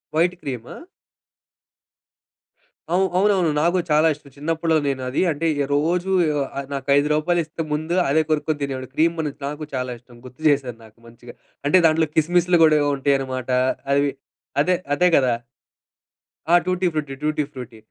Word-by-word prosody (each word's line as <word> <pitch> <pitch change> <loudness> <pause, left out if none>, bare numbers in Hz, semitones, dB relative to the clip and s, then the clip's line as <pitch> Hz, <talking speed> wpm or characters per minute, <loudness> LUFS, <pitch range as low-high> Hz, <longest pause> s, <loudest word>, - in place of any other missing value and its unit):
White 175 +3 +2
క్రీమా? 125 -4 -6 2.2
అవు 190 +1 +3
అవునవును. 190 -5 +3
నాకు 175 +3 +2
చాలా 155 +2 +4
ఇష్టం 140 -1 -17
చిన్నప్పులో 160 +2 0
నేను 135 -1 -1
అది 135 - -1
అంటే, 160 +3 -2 0.3
రోజు 175 +6 0 0.6
నాకైదు 140 +1 +2
రూపాయలు 170 +3 +1
ఇస్తే 160 +1 -7
ముందు 160 +3 -1
అదే 160 +3 +3
కొనుక్కొని 155 -1 0
తినేవాడిని. 130 -2 -4
క్రీమ్ 165 +2 +2
బన్ 150 -2 -1 0.2
నాకు 150 +1 -6
చాలా 125 -1 -2
ఇష్టం 120 -1 -19
గుర్తు 130 +4 -14
చేసారు. 130 -5 0
నాకు 110 +1 -20
మంచిగా 120 +1 -13 0.3
అంటే 185 - +5
దాంట్లో 160 0 +3
కిస్మిస్లు 175 +2 +3
కూడా 155 -1 +5 0.2
ఉంటాయన్నమాట 135 -2 -1 0.4
అవి 140 0 +2 0.5
అదే 180 +5 +2 0.2
అదే 180 +4 +3
గదా? 125 -3 +2 1.2
ఆ! - - +9
Tutti 185 0 0
frutti, 145 -3 -3
tutti 155 0 0
frutti 125 -4 -9
150 Hz, 140 wpm, -22 LUFS, 135-165 Hz, 2.2 s, ఆ